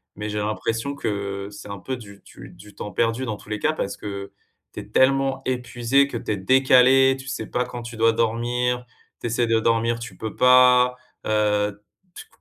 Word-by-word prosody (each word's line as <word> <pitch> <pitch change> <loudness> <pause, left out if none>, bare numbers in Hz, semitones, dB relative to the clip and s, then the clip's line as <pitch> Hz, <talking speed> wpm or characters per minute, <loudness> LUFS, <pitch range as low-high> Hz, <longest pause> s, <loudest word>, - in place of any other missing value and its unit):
mais 105 +1 -5
j'ai 105 - -4
l'impression 115 +5 -2
que, 100 -4 -4
heu, 105 - -12
c'est 100 - -11
un 100 -1 -6
peu 130 +7 -5
du 100 -4 -13
du - - -13
du 105 +1 -15
temps 105 - -7
perdu 115 +4 0
dans 110 -4 -3
tous 105 - -16
les 105 -1 -3
cas. 155 - +1
Parce 100 -10 -4
que, 100 -1 -7 0.4
tu - - -7
es - - -9
tellement 135 0 +2
épuisé 125 +2 +1
que 135 - -8
tu 110 - -3
es 105 - -1
décalé, 130 +4 +5
tu 130 - -11
sais 130 -5 -4
pas 125 - -1
quand 120 -1 -7
tu 115 -1 -9
dois 115 0 +4
dormir. 120 +2 -1 0.3
Tu - - -4
essaies 120 +1 0
de 115 -1 +2
dormir, 115 +1 +1
tu 120 - -8
peux 110 -1 -6
pas, 125 0 +6 0.3
heu, 105 -1 0 0.3
tu - - -8
c - - -29
115 Hz, 215 wpm, -23 LUFS, 105-125 Hz, 0.4 s, pas